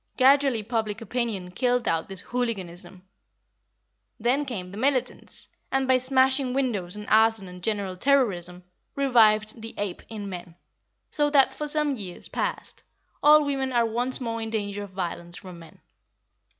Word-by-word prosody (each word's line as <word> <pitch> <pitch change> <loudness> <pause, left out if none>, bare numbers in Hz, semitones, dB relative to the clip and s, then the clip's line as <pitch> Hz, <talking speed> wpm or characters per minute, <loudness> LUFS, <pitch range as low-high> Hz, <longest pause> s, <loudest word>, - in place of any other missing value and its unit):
Gradually 270 -3 +4
public 220 -1 -2
opinion 225 -5 -3
killed 245 +5 0
out 165 +2 0
this 190 -1 -3
hooliganism. 190 -6 -4 1.2
Then 255 +6 +1
came 190 -9 -5
the 200 - -9
militants, 265 0 -1 0.2
and, 270 -1 +1
by 260 -1 +4
smashing 260 0 +2
windows 210 -10 -1
and 210 0 -7
arson 220 -2 +3
and 180 0 -11
general 200 -2 -1
terrorism, 180 -8 +1 0.3
revived 220 -5 +3
the 225 0 -8
ape 205 -3 -3
in 210 -3 -6
men, 175 -3 -8 0.6
so 295 -1 +2
that, 280 -2 +4
for 300 - -4
some 295 -2 0
years 185 -5 -5
past, - - -3 0.4
all 300 0 +7
women 270 -2 -1
are 240 -2 +3
once 245 +3 0
more 230 -2 -3
in 225 - -4
danger 205 -2 -3
of 205 - -7
violence 175 -2 -4
from 180 -3 -10
men. 165 - -15
225 Hz, 150 wpm, -26 LUFS, 190-260 Hz, 1.2 s, all